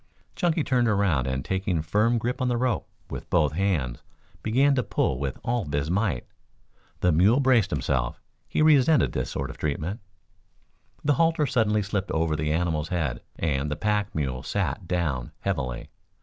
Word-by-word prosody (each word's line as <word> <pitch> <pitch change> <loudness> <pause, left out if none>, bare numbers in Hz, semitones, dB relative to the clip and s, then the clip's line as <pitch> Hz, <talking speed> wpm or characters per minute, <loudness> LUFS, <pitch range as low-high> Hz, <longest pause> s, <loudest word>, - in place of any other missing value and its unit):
Chunky 170 -4 +1
turned 125 -3 +2
around 100 - +2
and 65 0 -2
taking 95 -4 -1
firm 110 +8 +2
grip 120 +3 -2
on 130 - +1
the 120 -1 +1
rope 125 -1 -1 0.2
with - - -6
both 75 -5 +3
hands 80 -9 -1 0.4
began 135 +6 +3
to 130 - +2
pull 100 - 0
with 70 -2 -3
all 120 0 0
his 70 +2 -1
might. 95 - 0 0.8
The 90 - +4
mule 95 - +4
braced 125 -7 +4
himself. 65 -5 -1 0.3
He - - +1
resented 150 -1 +5
this - - -2
sort - - -3
of - - -14
treatment. 75 +7 -2 1.0
The 145 - +3
halter 165 -2 +3
suddenly 110 -5 +2
slipped 100 0 -2
over 80 -1 0
the 75 0 -1
animal's 80 -2 0
head, 75 -9 -1 0.2
and 75 -3 -1
the 75 - -2
pack 105 +2 -1
mule 65 -5 -2
sat 85 - -2
down 80 -9 -1
heavily. 65 -11 -3
95 Hz, 165 wpm, -26 LUFS, 75-120 Hz, 1.0 s, resented